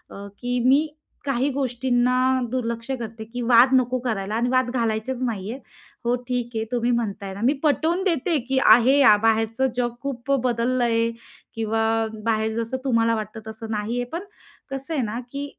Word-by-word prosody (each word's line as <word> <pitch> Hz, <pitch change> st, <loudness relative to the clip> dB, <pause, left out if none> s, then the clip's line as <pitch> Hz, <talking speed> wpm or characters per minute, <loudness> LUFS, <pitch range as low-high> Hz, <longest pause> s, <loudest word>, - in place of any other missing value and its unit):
अ, 200 Hz, 0 st, -9 dB
की 245 Hz, 0 st, -1 dB
मी 280 Hz, +4 st, +5 dB, 0.4 s
काही 275 Hz, 0 st, 0 dB
गोष्टींना 250 Hz, -1 st, +1 dB, 0.3 s
दुर्लक्ष 235 Hz, -1 st, -3 dB
करते, 220 Hz, -1 st, -6 dB
की 245 Hz, +3 st, -7 dB
वाद 240 Hz, +2 st, +5 dB
नको 255 Hz, 0 st, +2 dB
करायला 215 Hz, -4 st, -2 dB
आणि 235 Hz, +2 st, +1 dB
वाद 255 Hz, -1 st, +2 dB
घालायचेच 235 Hz, +1 st, -2 dB
नाहीयेत. 225 Hz, +1 st, -3 dB, 0.4 s
हो, 240 Hz, -, +2 dB
ठीक 245 Hz, -1 st, -2 dB
हे, 220 Hz, -, -1 dB
तुम्ही 240 Hz, 0 st, +1 dB
म्हणताय 200 Hz, -5 st, -2 dB
ना, 200 Hz, -, -8 dB
मी 260 Hz, -, +4 dB
पटवून 320 Hz, +4 st, +1 dB
देते 330 Hz, -2 st, +1 dB
की 265 Hz, -, +2 dB
आहे 245 Hz, +6 st, +6 dB
अ, 215 Hz, -6 st, +7 dB
बाहेरचं 225 Hz, +3 st, +2 dB
जग 240 Hz, -1 st, -1 dB
खूप 275 Hz, -1 st, -5 dB
बदललं 235 Hz, -1 st, +1 dB, 0.4 s
किंवा 225 Hz, 0 st, -1 dB, 0.4 s
बाहेर 220 Hz, 0 st, 0 dB
जसं 230 Hz, +3 st, -3 dB
तुम्हाला 230 Hz, -3 st, +2 dB
वाटतं, 215 Hz, 0 st, -5 dB
तसं 220 Hz, 0 st, -8 dB
नाहीये. 225 Hz, +3 st, -2 dB
पण, 350 Hz, +4 st, -4 dB, 0.5 s
कसं 270 Hz, +4 st, -4 dB
आहे 280 Hz, -, 0 dB
ना, 225 Hz, +1 st, -3 dB
की 280 Hz, 0 st, -3 dB
240 Hz, 165 wpm, -23 LUFS, 225-260 Hz, 0.5 s, अ